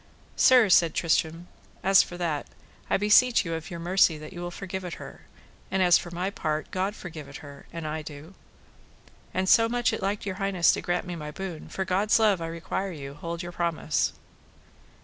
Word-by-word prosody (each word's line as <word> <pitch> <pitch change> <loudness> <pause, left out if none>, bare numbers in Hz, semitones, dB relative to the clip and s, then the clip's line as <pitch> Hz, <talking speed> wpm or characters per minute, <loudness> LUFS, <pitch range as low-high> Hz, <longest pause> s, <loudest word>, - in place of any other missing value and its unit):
Sir, 250 -4 +6
said 170 -3 +4
Tristram, 165 +1 0 0.4
as 195 0 +6
for 175 - -6
that, 165 -5 -2 0.4
I - - +3
beseech 210 +3 +4
you 165 - -3
of 160 -1 -5
your 170 - -6
mercy 175 -1 +3
that 155 +3 -10
you 175 - -7
will 175 - -4
forgive 190 +1 -6
it 175 -2 -5
her, - - -11 0.5
and 190 0 +1
as 175 -1 +6
for 175 - -8
my 180 +3 -3
part, 155 -5 -3
God 190 +3 -1
forgive 160 -7 -9
it - - -9
her, 140 -1 -12
and 165 -2 -6
I 155 +1 -3
do; 150 +3 -10 1.0
and 185 +1 -1
so 225 +3 +5
much 240 0 +1
it - - -3
liked 200 +2 -2
your 190 -2 -4
highness 195 -4 +3
to - - -2
grant 175 +1 -1
me 180 -1 -5
my 150 -2 -6
boon, 175 0 -7
for 190 - -3
God's 195 +4 +2
love 210 -5 +3
I 165 - -3
require 170 +4 -4
you 140 -4 -8
hold 170 +4 -6
your 175 - -6
promise. 170 -3 -1
175 Hz, 205 wpm, -27 LUFS, 165-195 Hz, 1.0 s, Sir